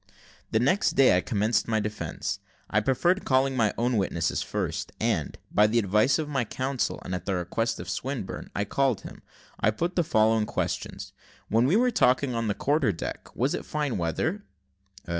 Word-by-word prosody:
The 110 - +2
next 140 - +2
day 135 -8 +5
I 90 - +3
commenced 110 +1 0
my 110 -1 +1
defence: 105 -2 -4 0.3
I 105 - +4
preferred 170 - +1
calling 135 0 +2
my 110 -4 +2
own 120 0 +1
witnesses 85 -5 0
first, - - -3
and, 110 -10 -1
by 105 +1 +5
the 115 +2 +1
advice 105 +4 +3
of 155 -2 -2
my 135 -4 0
counsel, 130 +3 -2
and 90 - -4
at 90 0 -4
the 95 - +1
request 115 +6 -1
of 85 - -7
Swinburne, 110 +3 -4
I 105 - 0
called 130 0 +1
him. - - -10 0.4
I - - +3
put 170 - -2
the 175 - +3
following 110 -6 +3
questions: - - -3 0.4
"When 115 +4 +3
we 165 - +3
were 250 +3 +3
talking 130 - +3
on 115 -1 -1
the 105 - 0
quarter 145 -5 +2
deck, 85 - -6
was - - +1
it - - -3
fine 145 -8 -2
weather?" 160 - -1
115 Hz, 185 wpm, -27 LUFS, 105-135 Hz, 0.4 s, day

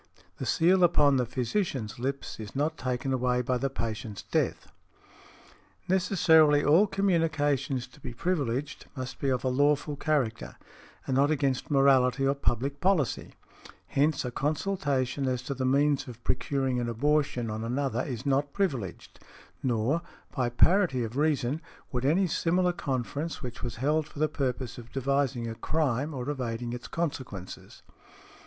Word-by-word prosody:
The - - -4
seal 180 +3 +4
upon 145 -5 +5
the 125 -2 0
physicians 130 - -2
lips 135 0 -4
is 105 +1 -8
not 150 +3 0
taken 130 0 -2
away 125 -1 +1
by 125 0 0
the 135 - 0
patient's 110 -4 -5
death. - - -1 1.2
Necessarily 160 -6 +4
all 170 +8 +5
communications 155 -9 +1
to - - -19
be 125 - -7
privileged 140 -2 -2
must 130 -1 -6
be 140 - 0
of 130 -2 0
a - - 0
lawful 145 +3 +2
character, 140 -7 -1 0.5
and 130 - -1
not 140 +2 +4
against 135 -4 0
morality 135 -2 +4
or 135 - +3
public 140 +1 -1
policy; 180 -8 +1 0.5
hence 145 0 +1
a 125 - -3
consultation 145 -3 -1
as 125 -1 -1
to 140 - -3
the 130 -1 -2
means 140 +1 +2
of 120 -2 -10
procuring 130 -1 0
an 120 -1 -2
abortion 130 -2 0
on 110 +1 -4
another 125 0 -1
is 125 -1 -5
not 140 +1 +1
privileged; 135 - -3 0.4
nor, 125 +6 +1 0.3
by 125 -3 +1
parity 160 0 +3
of 115 +1 -5
reason, 145 -1 +1 0.3
would 125 0 -2
any 170 +7 +3
similar 180 +1 +1
conference 145 +3 -3
which 125 -2 -6
was 120 -2 -4
held 150 +5 0
for - - -15
the 155 +1 +2
purpose 130 -5 -3
of 120 0 -12
devising 135 -2 0
a 115 - -4
crime 140 +3 -1
or 125 -4 -5
evading 120 -4 -3
its 120 - -6
consequences. 130 - -5
135 Hz, 150 wpm, -28 LUFS, 125-150 Hz, 1.2 s, upon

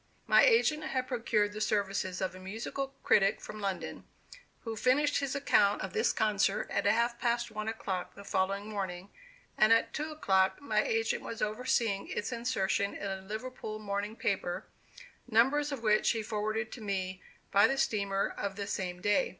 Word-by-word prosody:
My - - +6
agent 455 -11 +4
had 255 -1 -2
procured 220 -4 0
the 215 - -5
services 200 -3 0
of 185 -2 -1
a 185 - -10
musical 230 +8 -5
critic 195 0 +4
from 215 - -8
London, 195 -2 -3 0.6
who 225 -1 -4
finished 285 +6 +2
his 275 -1 -2
account 205 -7 +3
of - - -5
this 445 0 +2
concert 205 -2 +1
at - - +1
half 235 +3 +2
past 235 -1 0
one 215 0 -4
o'clock 195 -5 -3
the 200 - -10
following 195 +1 -1
morning, 190 -3 -5 0.5
and 215 +1 +6
at 230 0 +4
two 305 +1 -3
o'clock 190 -10 +2
my 285 - +1
agent 455 -1 0
was 230 - -6
overseeing 215 -2 0
its 210 - -3
insertion 200 -4 0
in 200 - -4
a 190 0 -4
Liverpool 215 +2 -6
morning 205 0 -3
paper, 190 -5 -2 0.6
numbers 270 +6 +3
of 265 -5 -5
which 215 -1 +3
he 225 -2 0
forwarded 215 +1 -2
to 240 - -8
me 190 -3 -3 0.3
by 200 +2 +6
the 270 - -1
steamer 200 -5 +1
of 200 -1 -3
the 200 0 -4
same 180 -3 -4
day. 205 +6 +3
215 Hz, 175 wpm, -31 LUFS, 195-240 Hz, 0.6 s, My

